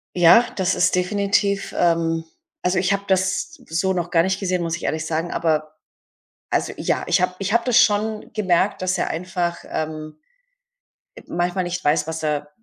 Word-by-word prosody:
Ja, 180 +7 +7
das 185 -1 +1
ist - - +2
definitiv 200 +1 0
ähm, 165 -1 +1 0.4
also, 180 +1 +2
ich 185 +2 +1
habe 200 0 -2
das 190 - 0
so 170 +4 0
noch 175 -2 -2
gar 165 -1 +3
nicht 190 +1 -1
gesehen, 185 -2 -1
muss 165 0 -2
ich - - -12
ehrlich 160 +1 -2
sagen, 165 +2 -2
aber 155 -1 -1 0.7
also, - - -1
ja, - - -1
ich - - +3
habe 180 0 0
ich 195 +1 -2
habe 235 0 +3
das 250 -3 +4
schon 215 +1 +1
gemerkt, 190 -2 +1
dass 185 0 0
er - - -1
einfach, 175 0 -3
ähm, 155 -1 -5 1.0
äh, 485 - -11
manchmal 175 +2 -1
nicht 180 +1 -3
weiß, 150 0 +2
was 160 -1 -4
er 150 -1 -1
180 Hz, 180 wpm, -22 LUFS, 165-195 Hz, 1.0 s, Ja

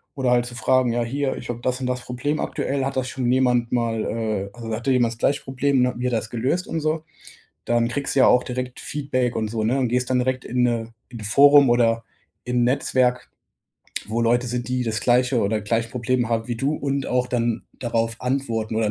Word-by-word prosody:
oder 130 -3 0
halt 120 -1 +3
zu 120 - -7
fragen: 130 -1 +2
„Ja, 120 0 0
hier, 135 +3 -2
ich - - -9
habe 120 0 -4
das 125 +1 -1
und 125 - -1
das 125 0 -2
Problem 145 +5 -2
aktuell, 135 -1 -2
hat 135 - -3
das 130 -1 -1
schon 125 -1 -1
jemand 125 -2 +2
mal 115 -2 0
äh, 110 -3 -2
also, 115 -1 -7
hatte 120 +4 -1
jemand 120 -3 +2
das - - -14
gleiche 140 +4 +1
Problem”, 135 0 +1
ne, 125 0 +2
und - - -10
wie 125 - -2
hat 125 - -1
er 115 - +2
das 110 - -8
gelöst 130 +10 -1
und 165 - -2
so. 155 +1 -1 0.6
Dann 120 0 +1
kriegst 140 +3 -2
du 135 - +3
ja - - +7
auch 125 - +4
direkt 125 0 -5
Feedback 130 -4 -2
und 110 -1 -1
so, 110 0 -2
ne, 125 +5 +1
und 130 -2 +1
gehst 125 +1 0
dann 130 - +3
direkt 130 0 -1
in 125 +1 -1
'ne 115 -1 -1 0.2
in 120 - -9
'n - - -7
Forum 140 +4 +6
oder 115 -1 +2 0.4
in 125 0 0
'n - - +4
Netzwerk, 125 -1 +1 0.8
wo 115 +2 -2
Leute 120 +2 +2
sind, 120 0 -3
die 125 0 -1
das 110 -2 -1
gleiche 125 +1 +2
oder 105 +2 0
gleiche 115 +2 -1
Probleme 125 0 0
haben 115 -1 -1
wie 120 - -1
du 135 +6 0
und 140 -2 -2
auch 125 0 +1
dann 120 -2 -1 0.2
darauf 115 -2 -1
antworten 115 -4 -2
oder, 110 -2 +1
125 Hz, 240 wpm, -23 LUFS, 115-130 Hz, 0.8 s, ja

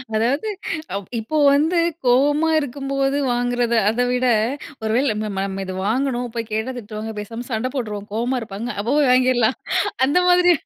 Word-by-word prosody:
அதாவது 250 - +1 0.5
அ - - 0 0.2
இப்போ 225 +8 -3 0.2
வந்து 320 +5 +2 0.3
கோவமா 290 +6 +3
இருக்கும்போத 275 0 -2 0.2
வாங்குறது. 245 -1 0
அதை 245 +3 +1
விட, 250 0 +1 0.5
ஒருவேளை 225 +6 +1
நம்ம 215 +1 -3
நம்ம 195 -1 -2
நம்ம 195 0 -4
இதை 185 0 -5
வாங்கணும். 250 +1 0
போய் 230 -1 -3
கேட்டா 220 +4 -2
திட்டுவாங்க. 220 0 -6
பேசாம 230 +4 -7
சண்டை 235 +3 -1
போட்டுருவோம். 210 -5 -4
கோவமா 245 +3 0
இருப்பாங்க. 220 +2 -6
அப்போ 210 +4 -1
போய் 285 -4 +4
வாங்கிரலாம். 255 -1 +3 0.5
அந்த 285 +5 +1
மாதிரி. 355 0 +6
245 Hz, 160 wpm, -21 LUFS, 220-270 Hz, 0.5 s, மாதிரி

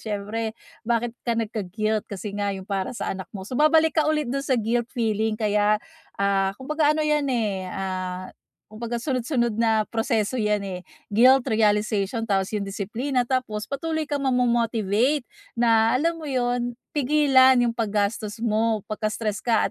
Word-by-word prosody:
siyempre, 220 +1 -4 0.3
bakit 235 0 0
ka 235 -2 -1
nagka-guilt? 215 -1 -2
Kasi 200 +1 -6
nga 205 0 -1
yung 190 -1 -6
para 195 +4 -2
sa - - -2
anak 190 -1 -7
mo, 190 -2 -7
so, 215 - -10
babalik 315 +2 +4
ka 305 - +1
ulit 305 -2 +1
dun 275 +3 -2
sa 270 -2 +1
guilt 235 +2 0
feeling 220 -2 0
kaya, 210 -1 +2 0.4
ah, 195 -1 +2
kumbaga 300 +3 +1
ano 310 - 0
yan, 300 -2 +1
eh, 210 -7 -1
ah, 185 -1 -4 0.4
kumbaga 230 +2 -4
sunod-sunod 245 -4 0
na 225 -2 +3
proseso 225 +1 0
yan, 210 -2 +1
eh. 185 -2 -6 0.2
Guilt, 255 +5 +6
realization, 210 0 +1
tapos 195 -1 0
yung 210 - -1
disiplina, 235 +6 -2
tapos 240 -5 -2
patuloy 315 +2 -2
kang 290 -1 -2
ma-momotivate 240 0 +1 0.3
na 225 -1 +4
alam 335 +3 +1
mo 330 - -10
yun, 245 -3 -1 0.2
pigilan 275 -2 +5
yung 230 - -1
pag-gastos 210 -1 -1
mo 220 -1 +1
pagka-stress 215 0 -2
ka 230 -2 +2
225 Hz, 155 wpm, -24 LUFS, 210-255 Hz, 0.4 s, Guilt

